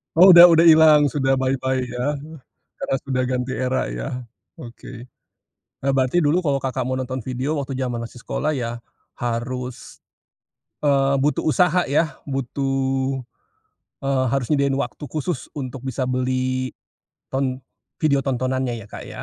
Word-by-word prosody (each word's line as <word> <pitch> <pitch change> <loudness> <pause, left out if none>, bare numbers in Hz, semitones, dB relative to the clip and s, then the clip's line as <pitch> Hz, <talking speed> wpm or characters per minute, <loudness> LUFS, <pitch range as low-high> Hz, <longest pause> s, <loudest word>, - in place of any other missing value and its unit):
Oh, 185 +3 +9
udah 175 0 +11
udah 165 -1 +5
ilang. 155 -3 +7
Sudah 135 -1 +1
bye 130 +1 0
bye, 130 -1 -1
ya. 125 +4 -2 0.6
Karena 135 - -1
sudah 130 -2 -1
ganti 125 0 -2
era, 130 - -1
ya? - - -4 0.5
Oke. 120 0 -10 0.8
Eee, 135 - +2
berarti 130 +5 +2
dulu 160 +4 +2
kalau 140 -2 +1
Kakak 130 -1 -2
mau 130 +1 -2
nonton 130 -1 -4
video, 130 +4 -2
waktu 135 -2 -4
jaman 120 -3 -2
masih 120 +1 -11
sekolah, 155 +4 -2
ya 120 -1 -4 0.3
harus, 125 +1 -5 0.8
eee, 140 -1 +3
butuh 145 +2 +1
usaha, 180 +2 +3
ya. 155 +3 0
Butuh, 135 0 -1 0.8
eee, 135 -1 +1
harus 135 -3 0
nyediain 140 -2 +2
waktu 125 +2 -4
khusus, 155 +3 -4
untuk 130 -2 -6
bisa 130 0 -2
beli 130 0 -1 0.6
ton 130 -1 -1 0.4
video 140 -3 +2
tontonannya, 130 -2 -1
ya 110 - -10
Kak, - - -9
ya. - - -8
130 Hz, 145 wpm, -22 LUFS, 125-140 Hz, 0.8 s, udah